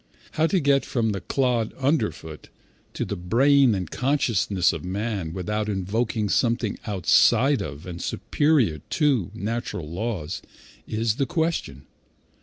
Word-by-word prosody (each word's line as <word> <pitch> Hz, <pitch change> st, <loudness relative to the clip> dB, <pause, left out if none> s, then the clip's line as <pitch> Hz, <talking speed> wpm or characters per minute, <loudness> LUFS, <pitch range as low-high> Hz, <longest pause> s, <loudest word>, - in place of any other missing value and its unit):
How 160 Hz, +1 st, +2 dB
to 190 Hz, +2 st, +2 dB
get 140 Hz, -3 st, +3 dB
from 115 Hz, -3 st, -1 dB
the 100 Hz, -, -4 dB
clod 125 Hz, -5 st, 0 dB
underfoot 85 Hz, -, -2 dB, 0.5 s
to -, -, -2 dB
the -, -, -4 dB
brain 125 Hz, +7 st, +4 dB
and 90 Hz, -3 st, -3 dB
consciousness 115 Hz, -9 st, +1 dB
of -, -, -6 dB
man 95 Hz, -2 st, -3 dB
without 105 Hz, +4 st, -2 dB
invoking 105 Hz, +3 st, -1 dB
something 115 Hz, +3 st, 0 dB
outside 125 Hz, -, +4 dB
of, 70 Hz, 0 st, -7 dB
and 85 Hz, -1 st, -7 dB
superior 135 Hz, -, +1 dB
to, 130 Hz, -, 0 dB
natural 110 Hz, -7 st, -4 dB
laws, 90 Hz, -1 st, -4 dB, 0.5 s
is 110 Hz, +1 st, -1 dB
the 135 Hz, -, 0 dB
question. 165 Hz, -, -2 dB
110 Hz, 130 wpm, -24 LUFS, 90-135 Hz, 0.5 s, brain